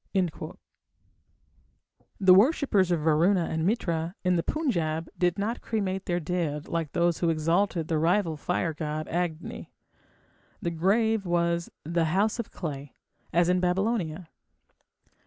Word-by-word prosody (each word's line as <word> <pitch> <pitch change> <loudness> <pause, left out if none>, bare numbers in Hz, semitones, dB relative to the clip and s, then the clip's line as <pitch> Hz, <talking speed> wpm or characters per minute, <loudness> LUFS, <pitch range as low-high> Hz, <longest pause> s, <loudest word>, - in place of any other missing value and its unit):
The 190 -2 +7
worshippers 205 - +4
of 170 -3 +1
Varuna 165 +4 +3
and 160 0 -1
Mitra 170 -5 -1
in 180 -1 +2
the 170 - +2
Punjab 165 - -1
did 175 +1 +1
not 220 +4 -2
cremate 195 -4 -2
their 175 0 0
dead 160 -3 -2
like 165 -3 -3
those 170 -1 +1
who 170 - +1
exalted 165 +2 +1
the 160 -2 0
rival 170 0 +2
fire 165 +2 -1
god 155 0 -4
Agni. 170 -1 -3 0.9
The 170 - -2
grave 200 +4 +1
was 170 0 0
the 165 +2 0
"house 200 +8 +1
of 235 - -3
clay", 145 -4 -6 0.4
as 170 +1 +3
in 180 0 +3
Babylonia. 180 -2 -1
175 Hz, 130 wpm, -27 LUFS, 160-195 Hz, 0.9 s, The